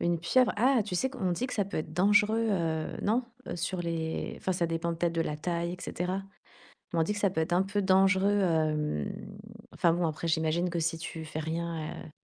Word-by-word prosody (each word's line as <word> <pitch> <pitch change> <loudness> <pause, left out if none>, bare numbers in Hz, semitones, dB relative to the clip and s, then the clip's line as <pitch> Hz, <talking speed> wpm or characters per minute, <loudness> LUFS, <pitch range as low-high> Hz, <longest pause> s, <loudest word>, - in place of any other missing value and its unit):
Une 170 0 +1
pieuvre! 245 +9 +3
Ah, 250 +2 +4
tu 195 - -4
sais 265 +9 +1
qu'on 205 -9 -1
dit 240 +9 -1
que 265 - -5
ça 205 - +1
peut 195 - -4
être 155 0 -5
dangereux, 210 +5 +4
heu, 160 -5 -1
non? 230 +5 +2 0.2
Heu, 175 - -3
sur 180 +2 -2
les, 165 -2 -2
enfin, 190 - -1
ça 175 -1 0
dépend 165 +1 -1
peut-être 170 0 0
de 165 - +1
la 150 -2 -1
taille 170 +2 -2
et - - -5
cetera. 185 +3 -2 0.7
Mais 170 - +1
on - - +5
dit 165 - 0
que 210 - -4
ça 200 -2 +2
peut 170 - -1
être 160 +2 -1
un 180 +2 +4
peu 195 +1 -1
dangereux, 190 +1 +4
hem, 155 - +1 0.6
enfin, 170 - +3
bon, 175 0 +1
après 160 +1 -3
j'imagine 160 +2 +1
que 170 - -2
si 165 0 0
tu 160 0 -6
fais 155 0 -5
rien, 165 0 -3
heu, 160 - -11
170 Hz, 230 wpm, -29 LUFS, 160-195 Hz, 0.7 s, on